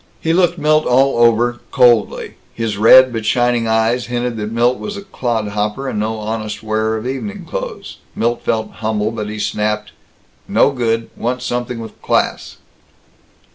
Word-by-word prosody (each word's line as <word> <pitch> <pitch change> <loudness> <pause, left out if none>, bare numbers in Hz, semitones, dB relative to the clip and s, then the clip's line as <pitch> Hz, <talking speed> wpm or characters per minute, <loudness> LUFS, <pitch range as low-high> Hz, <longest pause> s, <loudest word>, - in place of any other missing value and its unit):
He 165 - 0
looked 175 0 +2
Milt 155 0 +2
all 130 0 +3
over, 120 +1 +3
coldly. 120 -4 +3 0.2
His 115 -2 -2
red 125 +4 +7
but 115 -1 -3
shining 120 0 +1
eyes 115 +2 +1
hinted 120 0 -2
that 105 0 -4
Milt 120 +2 +1
was 205 -1 -5
a 200 - -7
clodhopper 110 - -2
and 105 - -2
no 110 +1 -2
honest 110 -1 -4
wearer 110 0 0
of 110 - -6
evening 185 +10 -5
clothes. - - -6 0.2
Milt 120 +1 0
felt 110 -1 -1
humble, 110 -1 -1
but 105 -2 -5
he 105 - -6
snapped, 105 0 -2 0.6
"No - - +3
good. 115 -3 -1
Want 125 +1 -3
something 125 -1 -3
with 115 -1 -10
class." - - -1
115 Hz, 160 wpm, -17 LUFS, 110-125 Hz, 0.6 s, red